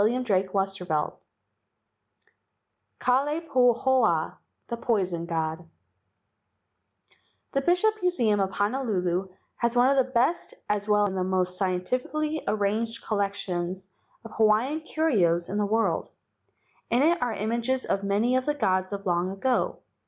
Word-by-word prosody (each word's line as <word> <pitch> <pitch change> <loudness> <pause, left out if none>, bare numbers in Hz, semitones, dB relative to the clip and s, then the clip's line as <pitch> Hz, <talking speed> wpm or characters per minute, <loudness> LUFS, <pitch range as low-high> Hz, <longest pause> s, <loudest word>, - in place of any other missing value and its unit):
io8 205 - +5
LEGENDS 255 -1 -3 0.2
OF 190 - -16
GHOSTS 195 0 0
XIV 155 -4 -1 1.9
KALAI 280 +5 +1
PAHOA, 245 - +3 0.4
THE 235 - -3
POISON 185 -8 -1
GOD 160 0 -3 2.0
Bishop 430 +7 +2
Museum 240 - +2
of 195 -1 +1
Honolulu 195 -4 -1 0.3
has 235 0 0
one 245 +2 +5
of 275 - +2
the 260 -1 +2
best 260 +8 0
as 210 0 -1
well 210 0 +4
as 200 - -1
one 190 - -3
of - - +1
the 185 - -3
most 185 -1 +1
scientifically 255 +12 -1
arranged 215 +3 -1
collections 190 -3 -2 0.3
of 225 - -9
Hawaiian 225 +8 +2
curios 200 - +1
in 205 - -2
the 205 - +1
world. 225 +2 0 0.8
In 245 +3 +3
it 340 +2 +3
are 245 -2 0
images 235 +5 -1
of 195 - 0
many 210 +5 +1
of 255 +1 0
the 295 - +1
gods 185 -8 0
of 200 0 -5
long 175 0 +1
ago. 245 +7 -1
215 Hz, 140 wpm, -26 LUFS, 190-255 Hz, 2.0 s, io8